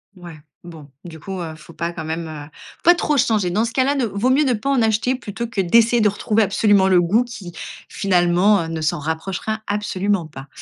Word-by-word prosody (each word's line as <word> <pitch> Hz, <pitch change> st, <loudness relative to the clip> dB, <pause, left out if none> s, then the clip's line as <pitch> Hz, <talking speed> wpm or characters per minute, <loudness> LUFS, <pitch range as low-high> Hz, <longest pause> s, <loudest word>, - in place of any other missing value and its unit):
Ouais, 175 Hz, -3 st, -11 dB, 0.3 s
bon, 160 Hz, -4 st, -12 dB
du 165 Hz, -2 st, -10 dB
coup, 190 Hz, +3 st, -6 dB
heu, 160 Hz, -2 st, -6 dB
faut 165 Hz, +1 st, -15 dB
pas 170 Hz, +2 st, -3 dB
quand 165 Hz, -2 st, -7 dB
même, 160 Hz, +1 st, -4 dB
heu, 150 Hz, -1 st, -9 dB, 0.4 s
pas 350 Hz, +1 st, +7 dB
trop 300 Hz, -4 st, 0 dB
changer. 215 Hz, -7 st, +1 dB
Dans 215 Hz, +6 st, +1 dB
ce 230 Hz, -, -5 dB
cas 260 Hz, -, +2 dB
là, 280 Hz, +2 st, +1 dB
ne 265 Hz, -4 st, 0 dB
vaut 215 Hz, +3 st, -1 dB
mieux 280 Hz, +3 st, +3 dB
ne 255 Hz, -, +2 dB
pas 225 Hz, +5 st, -3 dB
en 270 Hz, -4 st, +2 dB
acheter 220 Hz, +3 st, +1 dB
plutôt 235 Hz, -1 st, -6 dB
que 225 Hz, -3 st, -6 dB
d'essayer 230 Hz, +6 st, +3 dB
de 215 Hz, -, +4 dB
retrouver 210 Hz, +2 st, +1 dB
absolument 200 Hz, -1 st, +3 dB
le 185 Hz, -2 st, +4 dB
goût 210 Hz, +8 st, +2 dB
qui 200 Hz, -7 st, -9 dB, 0.4 s
finalement 180 Hz, -1 st, +2 dB
ne 165 Hz, 0 st, -4 dB
s'en 155 Hz, -1 st, -1 dB
rapprochera 180 Hz, +8 st, -4 dB
absolument 205 Hz, -2 st, -1 dB
pas. 145 Hz, -3 st, -11 dB
195 Hz, 220 wpm, -20 LUFS, 170-225 Hz, 0.4 s, pas